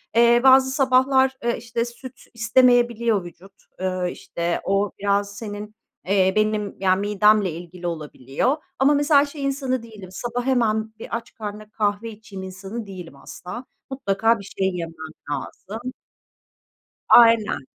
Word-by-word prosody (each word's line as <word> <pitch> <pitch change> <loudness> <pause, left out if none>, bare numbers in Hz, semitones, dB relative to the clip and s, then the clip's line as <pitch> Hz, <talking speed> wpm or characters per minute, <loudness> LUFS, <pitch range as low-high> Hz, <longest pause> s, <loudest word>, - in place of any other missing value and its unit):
Eee, 235 +1 +5
bazı 265 0 +6
sabahlar, 265 0 +3
eee, 235 0 0
işte, 230 0 -3
süt 255 +2 -11
istemeyebiliyor 235 -3 +3
vücut, 180 +3 -13 0.3
ııı, 185 -1 -1
işte 170 0 -3
o 195 +1 0
biraz 200 0 0
senin, 210 -1 -7 0.3
eee, 190 -1 +3
benim 215 -1 0
yani 190 0 +2
midemle 210 -2 +3
ilgili 175 +2 -7
olabiliyor 155 - -2 0.2
ama 280 +2 +5
mesela 290 0 +4
şey 285 -1 -8
insanı 265 -3 -1
değilim, 210 -5 -11
sabah 240 +5 -4
hemen 220 -4 +1
bir 230 - -4
aç 230 - -12
karnına 210 0 -7
kahve 210 +1 -1
içeyim 205 -3 -10
insanı 195 +4 -7
değilim 180 -6 -9
asla. 180 - -9 0.2
Mutlaka 225 -3 +1
bir 200 - -9
şey 190 -1 +2
yemem 165 -2 -5 0.4
lazım. 220 - -6 1.2
Aynen. 230 - +5
215 Hz, 135 wpm, -23 LUFS, 195-245 Hz, 1.2 s, bazı